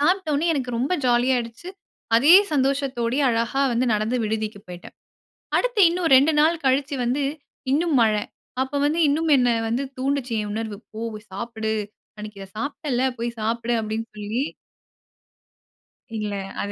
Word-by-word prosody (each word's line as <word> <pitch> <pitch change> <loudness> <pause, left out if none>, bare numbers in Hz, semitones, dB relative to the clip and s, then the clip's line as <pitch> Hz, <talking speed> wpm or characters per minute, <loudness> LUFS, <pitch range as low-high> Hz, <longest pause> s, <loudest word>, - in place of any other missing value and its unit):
சாப்பிட்டோனே 315 -1 +1
எனக்கு 265 -5 -2
ரொம்ப 265 +8 0
ஜாலியாகிடுச்சு. 245 +3 0 0.5
அதே 290 +9 +7 0.2
சந்தோஷத்தோடயே 270 -2 0
அழகா 235 +4 0
வந்து 240 +2 +1
நடந்து 215 +4 0
விடுதிக்கு 215 -1 -3
போயிட்டேன். 180 -1 -10 0.6
அடுத்து - - 0
இன்னும் 345 -1 -1
2 280 +5 +5
நாள் 325 +2 +2
கழிச்சு 275 +2 +1
வந்து, 260 +4 0 0.5
இன்னும் 315 +1 +2
மழை. 215 -2 +3 0.4
அப்போ 265 +2 -4
வந்து 315 +3 +1
இன்னும் 315 +3 +1
என்னை 245 -2 +3
வந்து 235 +4 0 0.2
தூண்டுச்சு, 265 -2 -1
என் 210 - -5
உணர்வு. 215 -2 -4
"போ. 220 - -7 0.3
சாப்பிடு. 220 +1 -3 0.4
அன்னைக்கு 210 -1 -8
இதை 195 - -10
சாப்பிட்டேல்ல. 275 -1 -2
போய் 235 +1 -2
சாப்பிடு." 230 +2 -1
அப்டின்னு 220 +1 -4
சொல்லி. 210 +5 -2 1.7
இல்ல. 210 -1 -3 0.3
அது 205 - -3
245 Hz, 135 wpm, -23 LUFS, 220-285 Hz, 1.7 s, அதே